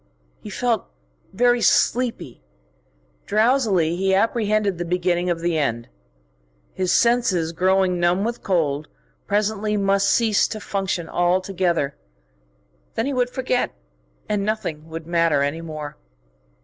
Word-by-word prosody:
He - - -9
felt 230 0 -1 0.4
very 245 +3 +2
sleepy. 235 - +1 0.9
Drowsily 215 -7 +2
he 190 +1 +1
apprehended 215 -3 +1
the - - -1
beginning 180 0 0
of 170 -1 -1
the 170 -2 0
end. 120 -5 -2 0.8
His 185 -1 -1
senses, 235 -9 +2
growing 185 +1 +2
numb 175 +3 +2
with 235 +2 -3
cold, 155 -6 0 0.4
presently 210 +1 0
must 195 0 +2
cease 220 -3 +3
to 215 - -6
function 195 -4 -3
altogether. 175 -4 0 1.0
Then 225 - 0
he 280 - -1
would 250 -1 +1
forget, 250 0 -1 0.5
and 205 -1 -1
nothing 165 -8 -3
would 160 0 -7
matter 165 -4 +2
any 145 +4 -2
more. 155 -3 -7
190 Hz, 125 wpm, -22 LUFS, 170-215 Hz, 1.0 s, cease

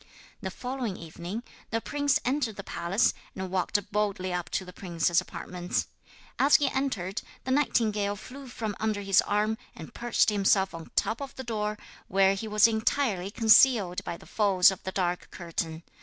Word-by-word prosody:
The - - -3
following 250 -6 -4
evening 175 +7 -6 0.3
the 225 - 0
prince 285 +3 +1
entered 250 -4 0
the 200 - -7
palace, 190 +6 +1 0.2
and 190 -1 -5
walked 190 +2 0
boldly 200 -3 -1
up 175 -1 -3
to 190 - -2
the 180 - -11
princess's 170 -2 +1
apartments. 180 0 -3 0.5
As 280 +2 +6
he 285 -2 +4
entered 220 -8 -2 0.2
the 260 - -3
nightingale 215 -7 +1
flew 265 +6 -10
from 220 -4 -4
under 215 -2 -1
his 195 0 +5
arm 215 +2 0 0.2
and 160 - -10
perched 240 -2 +2
himself 195 -1 +2
on 165 -1 -8
top 220 +5 +1
of 275 - -6
the 260 - -6
door, 210 -3 -2 0.3
where 195 +1 +4
he 195 +3 -4
was 210 +1 +5
entirely 220 -3 0
concealed 220 -3 +5
by 170 - -5
the - - -16
folds 200 -3 +4
of 190 - -7
the 190 - -4
dark 180 -2 -1
curtain. 165 -2 -5
205 Hz, 170 wpm, -28 LUFS, 185-230 Hz, 0.5 s, As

